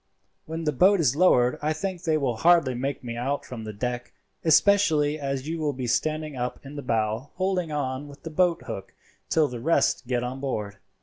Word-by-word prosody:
When 160 +1 -4
the 150 - +1
boat 185 +8 +4
is 140 -5 +2
lowered 125 -8 +4
I 155 +1 +1
think 185 +2 -4
they 160 -3 +1
will 130 -6 -1
hardly 165 -2 +4
make 130 +3 -3
me 120 -1 -5
out 135 +4 -2
from 115 -3 -7
the 110 - -5
deck, 120 +3 -4 0.3
especially 160 -4 +4
as 135 -1 -3
you 165 +1 -3
will 150 -2 0
be 130 -1 -4
standing 155 +4 -1
up 125 0 -3
in 140 +2 -9
the 145 - -4
bow 110 +1 -1
holding 185 -3 -1
on 140 -1 -2
with 145 0 -14
the 165 - -6
boat 175 +1 +2
hook 95 - -7 0.3
till 155 -2 +3
the 125 -2 -6
rest 145 -2 +1
get 125 -1 0
on 125 +2 -4
board." 105 -7 -3
145 Hz, 205 wpm, -26 LUFS, 125-160 Hz, 0.3 s, boat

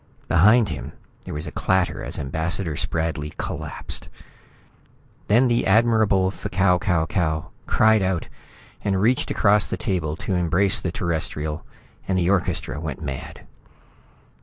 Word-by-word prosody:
Behind 105 +5 +5
him, 80 - -6 0.3
there - - -6
was 75 +2 -3
a 75 - -6
clatter 95 +3 0
as - - -2
Ambassador 80 +4 -2
Spradley 80 -1 -2
collapsed. - - -4 1.2
Then 120 +5 +4
the 120 -1 +1
Admirable 105 -3 +3
F'Kau 95 -2 +1
Kau 85 -4 +1
Kau 80 -4 -1 0.2
cried 110 -1 +4
out 95 -3 -1 0.6
and 95 -2 +1
reached 120 +6 +2
across 105 -1 +3
the - - -3
table 80 -6 -1
to 95 - -4
embrace 90 +3 +2
the 90 - -2
Terrestrial, 80 -3 -3 0.4
and 95 - +1
the 90 +1 +2
orchestra 90 -6 -1
went 80 -1 -5
mad. 70 -3 -6
90 Hz, 135 wpm, -23 LUFS, 80-100 Hz, 1.2 s, Behind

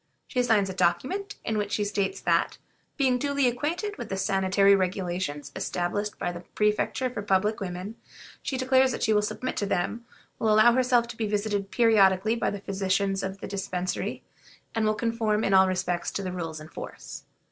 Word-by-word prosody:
She 250 - 0
signs 220 -5 +3
a 190 - -4
document, 270 - 0
in 220 -1 0
which 205 0 -2
she 210 - +1
states 200 -1 -1
that, - - +1 0.4
"being 260 -3 +2
duly 280 0 +1
acquainted 335 - -2
with - - -6
the 195 - -2
sanitary 195 0 +3
regulations 180 -5 -2
established 190 +2 -2
by 175 - -2
the 175 - -7
Prefecture 210 +7 0
for 245 -4 -5
Public 205 +2 +1
Women, 190 +3 -5 0.4
she 265 - -3
declares 260 0 +3
that - - -3
she 220 - +3
will 210 - +4
submit 255 +4 -3
to 205 - -1
them, 200 +5 -1 0.4
will 220 - +2
allow 215 +3 +6
herself 250 -2 +3
to 240 - -8
be 220 - -1
visited 205 -1 -1
periodically 215 -2 +4
by 235 - 0
the 205 - -5
physicians 195 0 0
of 190 0 -5
the - - -5
Dispensary, 185 -2 -3 0.5
and 220 -1 +1
will 215 - +2
conform 225 -1 0
in 195 - +1
all 190 0 +7
respects 180 -2 -1
to 200 - -3
the 185 - -3
rules 165 -3 -5
in 155 - -10
force." - - -8
205 Hz, 190 wpm, -27 LUFS, 190-230 Hz, 0.5 s, all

